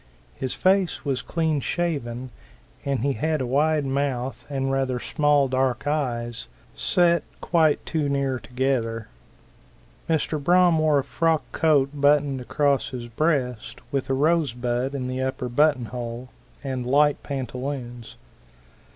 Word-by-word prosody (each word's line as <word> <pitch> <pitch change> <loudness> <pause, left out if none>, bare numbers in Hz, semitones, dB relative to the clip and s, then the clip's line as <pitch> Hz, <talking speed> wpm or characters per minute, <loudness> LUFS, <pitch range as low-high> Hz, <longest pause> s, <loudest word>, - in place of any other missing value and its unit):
His 130 -1 -4
face 190 -3 +2
was 135 -3 0
clean 160 -3 0
shaven, 130 -7 -2 0.5
and 140 -4 -1
he 140 +2 +1
had 155 +6 -1
a 130 - -1
wide 150 +3 +2
mouth 135 -2 -2
and 135 -1 -1
rather 135 -2 0
small 145 -1 +2
dark 130 -1 0
eyes, 120 -6 -2 0.3
set 170 -2 +2 0.2
quite 160 -3 +2
too 155 -3 -1
near 135 -2 0
together. 125 -4 -2 1.0
Mr. 155 -2 0
Braham 175 0 +4
wore 155 -2 +3
a 140 - +1
brown - - -23
frock 165 -2 +2
coat 145 -4 +3
buttoned 145 -2 +2
across 140 +2 +1
his 125 -2 -6
breast, 125 -4 -1
with 135 -2 -2
a 135 - +2
rose 155 -2 +2
bud 125 +2 -2
in 130 -2 -3
the 130 +1 -3
upper 130 -1 -2
buttonhole, 125 -3 0 0.3
and 130 -3 -3
light 145 +2 +3
pantaloons. 125 -3 -5
135 Hz, 135 wpm, -24 LUFS, 125-150 Hz, 1.0 s, Braham